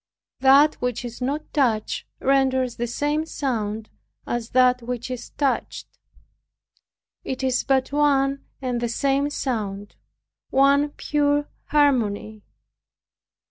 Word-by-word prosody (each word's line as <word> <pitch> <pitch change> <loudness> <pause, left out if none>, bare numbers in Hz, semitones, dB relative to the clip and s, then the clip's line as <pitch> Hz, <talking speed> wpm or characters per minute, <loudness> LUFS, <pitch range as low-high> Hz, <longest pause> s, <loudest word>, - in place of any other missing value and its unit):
That 275 +3 +5
which 245 -1 -2
is 240 +1 -8
not 285 +4 -3
touched 230 -7 0
renders 260 -2 +1
the 240 - -2
same 295 +6 -1
sound 220 -7 -3 0.3
as 240 -1 -3
that 250 0 +4
which 245 +1 -5
is 250 - -6
touched; 275 -3 -3 1.2
it 265 0 -4
is 255 -1 +1
but 265 -1 +1
one 275 -1 +2 0.2
and 245 -2 -1
the 240 - -1
same 275 +4 +1
sound, 205 -8 -4 0.5
one 280 +2 +4
pure 290 0 0 0.2
harmony. 220 -7 +1
260 Hz, 110 wpm, -23 LUFS, 240-280 Hz, 1.2 s, That